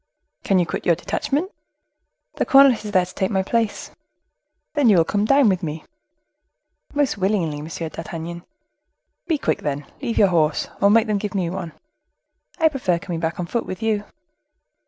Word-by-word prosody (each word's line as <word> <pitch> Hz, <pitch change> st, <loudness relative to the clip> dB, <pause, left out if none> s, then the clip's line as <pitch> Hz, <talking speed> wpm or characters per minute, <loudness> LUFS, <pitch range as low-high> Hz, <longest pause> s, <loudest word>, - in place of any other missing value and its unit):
"Can 195 Hz, -, +2 dB
you 175 Hz, -, +3 dB
quit -, -, -4 dB
your 170 Hz, -, +5 dB
detachment?" 295 Hz, -, -2 dB, 0.9 s
"The -, -, +2 dB
cornet 270 Hz, -5 st, +6 dB
is 210 Hz, -, -5 dB
there 185 Hz, -3 st, +3 dB
to 185 Hz, -, -13 dB
take 190 Hz, 0 st, -1 dB
my 190 Hz, -2 st, 0 dB
place." 225 Hz, +1 st, -1 dB, 0.8 s
"Then 290 Hz, -6 st, +3 dB
you 200 Hz, -, +6 dB
will 165 Hz, -, +4 dB
come 205 Hz, -, 0 dB
and 210 Hz, -, +1 dB
dine 275 Hz, -1 st, +5 dB
with 190 Hz, -2 st, +2 dB
me?" 160 Hz, -2 st, -5 dB, 1.1 s
"Most 285 Hz, -7 st, +1 dB
willingly, 180 Hz, -7 st, 0 dB
Monsieur 160 Hz, +1 st, -5 dB
d'Artagnan." 165 Hz, +2 st, -7 dB, 0.8 s
"Be 320 Hz, -, +1 dB
quick, -, -, -1 dB
then; 145 Hz, 0 st, -3 dB, 0.2 s
leave 235 Hz, -4 st, -3 dB
your 200 Hz, -, +5 dB
horse, 160 Hz, -3 st, +1 dB
or 200 Hz, -, +5 dB
make 225 Hz, +2 st, +5 dB
them 210 Hz, -3 st, 0 dB
give 210 Hz, 0 st, -4 dB
me 175 Hz, -3 st, -1 dB
one." 175 Hz, -4 st, -5 dB, 0.8 s
"I 325 Hz, -, +4 dB
prefer 255 Hz, -, 0 dB
coming 170 Hz, -1 st, -5 dB
back 165 Hz, +1 st, -2 dB
on 175 Hz, -, -1 dB
foot 235 Hz, +6 st, -3 dB
with 185 Hz, +3 st, -6 dB
you." 215 Hz, -2 st, 0 dB
190 Hz, 180 wpm, -22 LUFS, 170-225 Hz, 1.1 s, cornet